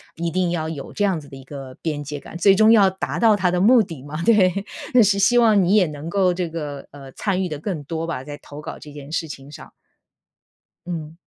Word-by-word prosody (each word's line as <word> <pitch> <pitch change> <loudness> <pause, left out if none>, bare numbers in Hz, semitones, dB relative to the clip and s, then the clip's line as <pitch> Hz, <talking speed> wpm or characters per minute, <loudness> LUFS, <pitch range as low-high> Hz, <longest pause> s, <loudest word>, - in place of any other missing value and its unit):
一 170 0 -3
定 180 -1 0
要 160 -2 -2
有 150 -4 -7
这 205 - -1
样 190 -5 +1
子 145 - -13
的 140 - -11
一 135 - -11
个 135 -1 -9
边 150 -3 -3
界 145 0 -6
感， 155 - -10
最 195 +3 +5
终 215 +2 +5
要 205 -4 +6
达 190 0 -4
到 225 -2 +5
他 185 -3 +1
的 180 - 0
目 230 +4 +6
的 165 -8 -9
嘛， 150 +4 -6
对。 200 -3 +3 0.3
那 250 -2 +7
是 200 -1 +2
希 240 +5 +4
望 220 -4 +5
你 185 +3 +3
也 205 -4 +5
能 150 +1 -7
够 185 -1 +2
这 180 -1 -2
个 150 -4 -6
呃， 135 -1 -12
参 190 +5 -1
与 180 - -3
得 150 -2 -5
更 155 -2 -4
多 165 +3 -4
吧， 165 -6 -4
在 145 +1 -8
投 145 +1 -10
稿 150 - -8
这 150 - -12
件 145 0 -10
事 165 0 -2
情 140 -1 -10
上。 150 - -12 1.1
嗯。 160 -3 -6
170 Hz, 265 characters per minute, -22 LUFS, 145-195 Hz, 1.1 s, 那